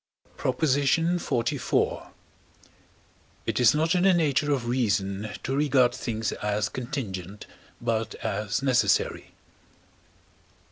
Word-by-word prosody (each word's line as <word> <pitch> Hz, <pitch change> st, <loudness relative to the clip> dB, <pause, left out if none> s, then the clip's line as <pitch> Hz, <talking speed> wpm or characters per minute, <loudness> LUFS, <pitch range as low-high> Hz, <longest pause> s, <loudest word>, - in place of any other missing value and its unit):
PROP. 130 Hz, +3 st, -2 dB
XLIV. 145 Hz, -2 st, +1 dB, 1.4 s
It -, -, -1 dB
is 125 Hz, +2 st, +5 dB
not 160 Hz, +2 st, +2 dB
in 180 Hz, -, +2 dB
the 190 Hz, -1 st, +5 dB
nature 150 Hz, -3 st, +1 dB
of 130 Hz, -4 st, 0 dB
reason 105 Hz, -4 st, 0 dB
to 135 Hz, -, -2 dB
regard 130 Hz, -4 st, +3 dB
things 110 Hz, -3 st, -3 dB
as 105 Hz, 0 st, -1 dB
contingent, 105 Hz, -, -5 dB, 0.3 s
but 115 Hz, -2 st, -2 dB
as 105 Hz, +5 st, -2 dB
necessary. 130 Hz, -2 st, +1 dB
125 Hz, 100 wpm, -26 LUFS, 110-145 Hz, 1.4 s, is